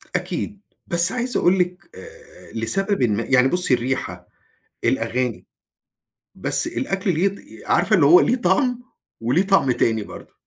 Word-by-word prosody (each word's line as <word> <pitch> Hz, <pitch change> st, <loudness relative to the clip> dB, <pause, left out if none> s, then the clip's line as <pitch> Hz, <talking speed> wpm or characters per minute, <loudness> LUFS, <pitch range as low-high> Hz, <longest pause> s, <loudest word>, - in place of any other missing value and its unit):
أكيد. 205 Hz, -2 st, -4 dB, 0.3 s
بس 175 Hz, +2 st, +4 dB
عايز 250 Hz, 0 st, -2 dB
أقول 185 Hz, +2 st, +2 dB
لِك 180 Hz, -1 st, -3 dB
آآ 95 Hz, -, -14 dB
لسببٍ 195 Hz, -, -1 dB
ما، 110 Hz, -1 st, 0 dB
يعني 130 Hz, +1 st, +3 dB
بُصّي 180 Hz, -2 st, +1 dB
الريحة، 125 Hz, +2 st, -3 dB, 0.6 s
الأغاني، 125 Hz, -2 st, -1 dB, 0.9 s
بس -, -, +1 dB
الأكل 195 Hz, -1 st, -2 dB
ليه 170 Hz, +5 st, +1 dB
ط 200 Hz, -, -4 dB, 0.3 s
عارفة -, -, +2 dB
اللي -, -, +3 dB
هو 355 Hz, -, +7 dB
ليه 250 Hz, -, +2 dB
طَعم، 245 Hz, +3 st, 0 dB, 0.4 s
وليه 125 Hz, +11 st, +1 dB
طَعم 195 Hz, -10 st, +3 dB
تاني 110 Hz, -3 st, 0 dB
برضه -, -, -13 dB
175 Hz, 145 wpm, -21 LUFS, 125-195 Hz, 0.9 s, هو